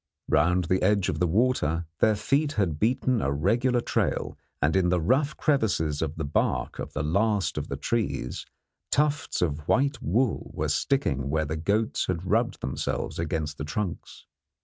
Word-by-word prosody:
Round 90 +4 +3
the 90 +2 +1
edge 100 -3 +2
of - - -2
the 90 - +2
water 85 -5 +1
their 110 -1 +4
feet 145 +7 +1
had 85 - 0
beaten 125 +1 +1
a 70 - 0
regular 120 - +1
trail, - - -1 0.2
and 75 +5 +2
in 90 -2 +3
the 90 0 +2
rough 135 - +1
crevices 100 - +1
of 80 -1 -2
the 80 - -3
bark 65 -3 -1
of - - -5
the 70 - -2
last 100 +5 +1
of - - -3
the - - -4
trees, 110 - -2 0.5
tufts 150 -8 +1
of 75 -2 -2
white 140 -1 +2
wool 110 - 0
were - - -1
sticking 70 - 0
where 80 +2 +1
the 75 +2 -3
goats 105 +8 0
had 90 0 -2
rubbed - - 0
themselves 65 - -3
against 80 -3 -2
the - - -3
trunks. 85 +5 -5
90 Hz, 170 wpm, -27 LUFS, 80-120 Hz, 0.5 s, their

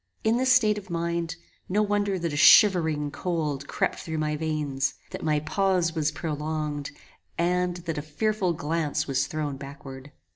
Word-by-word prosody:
In 220 +2 +3
this 260 +1 +2
state 215 -4 +4
of 205 0 -15
mind, 170 0 -2 0.3
no 210 +3 +2
wonder 205 -1 0
that 170 -3 -3
a - - -2
shivering 160 -4 +5
cold 150 -5 -2
crept - - -1
through 160 -1 -5
my 150 0 -1
veins; 145 -3 -1 0.2
that - - -6
my 150 -2 +1
pause 180 0 +1
was 155 -2 0
prolonged; 150 -2 -3 0.5
and, 180 +1 +1
that 165 -3 -2
a - - -3
fearful 185 +4 -1
glance 155 -1 -1
was 135 0 0
thrown 150 -3 -3
backward. 140 0 -10
160 Hz, 160 wpm, -26 LUFS, 150-180 Hz, 0.5 s, shivering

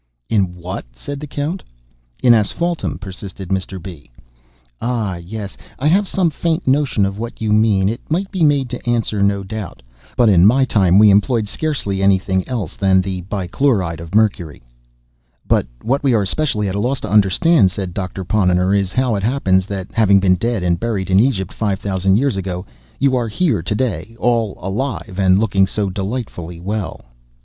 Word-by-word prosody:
"In 95 -5 +1
what?" 90 -1 -6
said 140 - -7
the 150 - -7
Count. 150 +7 -3 0.6
"In 120 - +7
asphaltum," 170 +10 0
persisted 95 -1 -9
Mr. 95 0 -2
B. 85 -8 -11 0.7
"Ah, 115 -6 -2
yes; 100 +4 -7 0.2
I 135 - -4
have 190 +6 +3
some 185 -4 +1
faint 165 +2 -2
notion 130 -6 +2
of 100 +1 -4
what 115 +1 -6
you 110 -1 0
mean; 105 -3 +3
it 115 +4 -2
might 185 +5 -1
be 190 -3 -3
made 145 -4 +3
to 125 0 -4
answer, 115 -3 0
no 100 0 +1
doubt—but 95 - -4
in 90 -5 +5
my 130 +4 +4
time 95 -6 +3
we 105 0 +7
employed 105 +2 +2
scarcely 105 -8 -2
any 95 0 +4
thing 95 0 -2
else 115 - -4
than 95 -1 +3
the 95 -1 -3
Bichloride 95 - 0
of 85 +3 -7
Mercury." 100 - +1 0.8
"But - - +2 0.2
what 135 +4 0
we 135 -4 +2
are 105 - +2
especially 105 -1 0
at 95 - -2
a 100 - -2
loss 130 +5 0
to - - -4
understand," 105 - +4
said 95 -1 -5
Doctor 95 0 -4
Ponnonner, 90 -1 +2
"is 100 -2 0
how 125 0 +1
it 100 - -1
happens 95 -5 +1
that, 95 -2 -5
having 100 -4 +4
been 95 -1 +3
dead 110 +2 -1
and 85 -1 +1
buried 100 -5 -2
in 95 - +5
Egypt 105 -6 +1
five 100 -3 -1
thousand 95 0 +1
years 130 -4 0
ago, 90 -1 -4 0.3
you 135 +1 +2
are 120 -2 0
here 115 - 0
to 90 +5 -2
day 115 -3 -3
all 115 -4 0
alive 100 -1 -4
and 95 -1 +4
looking 100 -2 +2
so 100 0 -2
delightfully 95 -4 -5
well." 100 -1 -4
100 Hz, 185 wpm, -18 LUFS, 95-120 Hz, 0.8 s, In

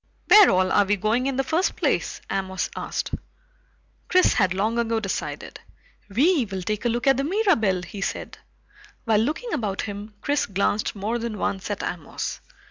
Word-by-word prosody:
"Where 420 -2 +9
all 185 0 +2
are 205 - +4
we 205 +1 +2
going 220 +6 0
in 275 - -1
the 270 - +1
first 325 +8 0
place?" - - -1
Amos 190 -1 -2
asked. - - -3 1.0
Chris 370 0 +4
had 190 -6 +2
long 215 +5 0
ago 230 -1 +1
decided. - - -4 0.5
"We'll 230 - +1
take 215 +5 -3
a - - +3
look 240 +3 -1
at 270 -1 +5
the 275 - 0
Mirabelle," 290 - +2
he 195 +3 -8
said. - - -4 0.7
While 220 -3 +3
looking 310 - -2
about 210 -9 -2
him, 205 0 -7
Chris 290 0 0
glanced 200 +2 0
more 215 +4 -2
than 230 -2 -4
once 195 0 -2
at 205 - -3
Amos. 170 -4 -4
220 Hz, 170 wpm, -24 LUFS, 195-270 Hz, 1.0 s, Where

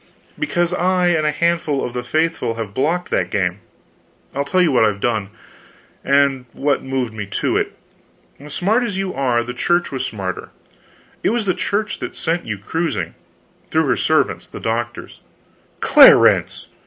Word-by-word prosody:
"Because 175 - 0
I 180 0 +2
and 155 -3 +1
a - - +2
handful 165 -3 0
of 120 - -6
the 125 - -3
faithful 155 -3 -1
have 110 -3 -5
blocked 165 - -1
that - - 0
game. 95 -1 -1 0.7
I'll 140 - -1
tell 185 +6 0
you 175 -4 +4
what 125 - +4
I've 105 -2 +1
done, 110 -3 -1 0.7
and 140 -2 +2
what 140 -1 0
moved 130 -4 -3
me 105 -2 -6
to 100 - -1
it. - - -2 0.7
Smart 195 - +1
as 230 -6 -2
you 195 -1 -2
are, 125 -3 +1
the 125 +1 -6
Church 175 +5 0
was 135 -2 -3
smarter. 95 -4 -5 0.7
It - - +1
was 230 0 0
the 185 - +2
Church 200 +4 -2
that - - -6
sent 170 +1 -2
you 105 -2 -3
cruising 100 - -3 0.6
through - - +2
her - - +2
servants, - - +1
the - - -9
doctors." 120 +1 -4 0.6
"Clarence!" - - +6
140 Hz, 165 wpm, -19 LUFS, 115-175 Hz, 0.7 s, Clarence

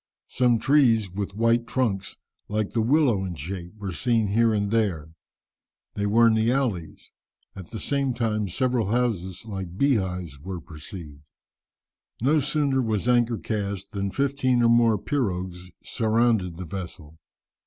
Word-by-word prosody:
Some 120 -1 +3
trees 115 -6 +3
with 100 0 -4
white 115 +1 +2
trunks, 105 -7 -1 0.3
like 105 0 -1
the 115 - 0
willow 125 -5 +3
in 90 -2 -4
shape, 85 +4 -7
were 100 -3 -5
seen 115 0 +1
here 115 +3 +3
and 100 -1 0
there. 95 -9 0 0.8
They 100 0 -1
were 115 +3 +5
"niaoulis." 110 - 0 0.4
At 95 -3 -9
the 110 - -6
same 140 -3 0
time 110 -3 -1
several 125 0 0
houses 105 -6 -1
like 95 -4 -6
bee 140 +1 +3
hives 90 -6 -4
were 90 +4 -6
perceived. 75 -2 -10 1.0
No 145 +6 +3
sooner 140 -2 +1
was 110 -2 -1
anchor 120 -2 +3
cast 100 -3 -4
than 100 -1 -2
fifteen 130 0 +1
or 115 - +5
more 115 -2 +4
pirogues 90 -8 -3
surrounded 110 -6 +1
the 90 - -6
vessel. 80 -4 -8
110 Hz, 145 wpm, -25 LUFS, 95-120 Hz, 1.0 s, were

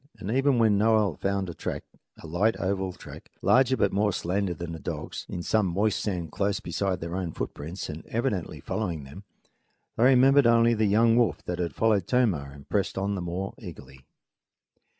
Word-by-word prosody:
And 105 -1 -5
even 135 +1 +2
when 110 -3 +4
Noel 110 -3 +3
found 100 +3 -2
a 85 - -6
track, - - -5 0.3
a - - -12
light 95 +8 +1
oval 95 0 -1
track, - - -12
larger 130 0 +4
but 100 - +1
more 105 +1 +2
slender 90 +1 -1
than 85 +1 -6
a 80 - -7
dog's, - - -6
in 85 - -5
some 110 0 +2
moist 100 +4 0
sand 90 -6 -3
close 100 0 -1
beside 90 +1 -2
their 85 +1 -4
own 90 -3 -3
footprints 80 +6 -5
and 80 +1 -7
evidently 115 -6 -2
following 85 -9 -3
them, 80 +10 -12 0.7
they 115 - +2
remembered 135 +1 +6
only 115 0 +5
the 110 -1 +1
young 115 +3 +4
wolf 120 -2 +1
that 90 0 -3
had 85 -1 -2
followed 105 -5 +2
Tomah 100 - +1
and 70 0 -14
pressed 100 -2 -1
on 100 +1 -1
the 95 - -3
more 90 +3 -4
eagerly. 65 -1 -11
100 Hz, 190 wpm, -27 LUFS, 85-110 Hz, 0.7 s, remembered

